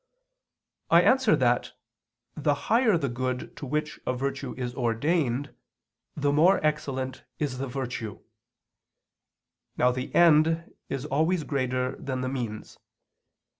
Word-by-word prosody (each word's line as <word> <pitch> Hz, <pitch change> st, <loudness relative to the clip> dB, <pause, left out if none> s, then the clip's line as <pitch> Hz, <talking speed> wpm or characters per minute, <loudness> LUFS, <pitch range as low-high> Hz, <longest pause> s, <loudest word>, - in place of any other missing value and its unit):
I 170 Hz, +1 st, +6 dB
answer 255 Hz, -2 st, +4 dB
that, 120 Hz, -1 st, +1 dB, 0.6 s
The 145 Hz, -1 st, +1 dB
higher 225 Hz, -, +2 dB
the 140 Hz, -, -1 dB
good 125 Hz, +1 st, -3 dB
to 140 Hz, -, -6 dB
which 150 Hz, +2 st, -2 dB
a 130 Hz, -, +1 dB
virtue 135 Hz, 0 st, -3 dB
is 125 Hz, -1 st, -3 dB
ordained, 130 Hz, +3 st, 0 dB, 0.6 s
the 145 Hz, -1 st, +1 dB
more 175 Hz, +6 st, +5 dB
excellent 135 Hz, -4 st, -2 dB
is 135 Hz, -4 st, -2 dB
the 135 Hz, -, -2 dB
virtue. 125 Hz, -5 st, -5 dB, 1.6 s
Now 125 Hz, -, +4 dB
the 130 Hz, +1 st, -4 dB
end 165 Hz, 0 st, +4 dB, 0.2 s
is 135 Hz, 0 st, -3 dB
always 160 Hz, +4 st, +1 dB
greater 130 Hz, -3 st, -1 dB
than 135 Hz, -4 st, -4 dB
the 130 Hz, -, -2 dB
means. 120 Hz, -5 st, -5 dB
135 Hz, 125 wpm, -27 LUFS, 125-155 Hz, 1.6 s, I